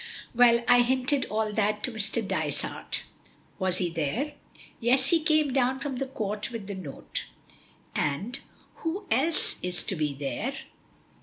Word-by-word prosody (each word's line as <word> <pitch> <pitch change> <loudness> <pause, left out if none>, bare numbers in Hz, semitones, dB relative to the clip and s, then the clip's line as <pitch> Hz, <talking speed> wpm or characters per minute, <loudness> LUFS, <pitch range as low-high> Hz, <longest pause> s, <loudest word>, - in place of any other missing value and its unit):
"Well, 235 -1 +6
I 245 0 +7
hinted 260 +3 +2
all 215 0 -1
that 210 0 +1
to 255 - +1
Mr. 220 0 0
Dysart." - - -1 0.6
"Was 185 -2 +2
he 180 -2 +1
here?" 170 - -2 0.5
"Yes. 260 +3 +4
He 335 -2 +4
came 310 -3 +3
down 260 0 +2
from 275 -1 -4
the 270 +1 -2
Court 210 -4 -3
with 230 -4 -6
the 200 - -5
note." 175 -8 -4 0.7
"And 195 - -1 0.4
who 355 +5 -3
else 295 +8 +2
is 180 -1 0
to 190 - -2
be 150 -3 -1
there?" 145 - -3
235 Hz, 150 wpm, -28 LUFS, 195-265 Hz, 0.7 s, I